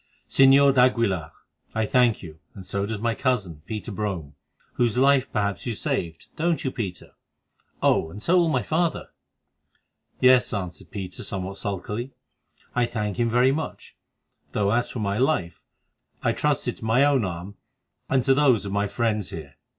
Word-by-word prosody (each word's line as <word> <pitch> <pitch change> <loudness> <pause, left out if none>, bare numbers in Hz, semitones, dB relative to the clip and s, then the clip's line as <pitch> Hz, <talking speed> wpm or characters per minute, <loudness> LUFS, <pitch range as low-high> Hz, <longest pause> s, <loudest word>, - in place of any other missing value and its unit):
"Señor 135 +1 +6
d'Aguilar, 115 - +2 0.4
I 110 0 +1
thank 125 -3 +2
you, 80 -2 -10 0.2
and 95 - -10
so 100 +1 -2
does 110 0 -3
my 115 +2 0
cousin, 105 - -1
Peter 110 +1 -5
Brome, 95 -8 -4 0.4
whose 120 -2 +1
life 135 0 +3
perhaps 100 0 -2
you 115 - -2
saved—don't 155 - -2
you, 130 - -1
Peter? 100 -9 -6 0.7
Oh! 80 - +3
and 95 - -9
so 170 +11 +2
will 170 -2 +4
my - - +1
father." 165 +1 -1 1.1
"Yes," 130 -1 +5
answered 90 -3 -6
Peter 95 -3 -6
somewhat 95 0 -4
sulkily, 105 +6 -4 0.6
"I 120 -1 +2
thank 105 -4 -3
him 120 -1 +1
very 125 +3 +4
much; 155 +3 -5 0.6
though 100 -1 +1
as 120 +2 +1
for - - -7
my 100 -1 -1
life, 125 - 0 0.6
I - - +3
trusted - - 0
to - - -8
my 125 +5 +4
own 140 -5 +3
arm 90 +2 -5 0.5
and 130 -2 +2
to 135 - +4
those 130 -7 +3
of 100 - -4
my 100 +1 0
friends 105 -2 -1
there. 70 -4 -9
110 Hz, 160 wpm, -25 LUFS, 100-130 Hz, 1.1 s, Señor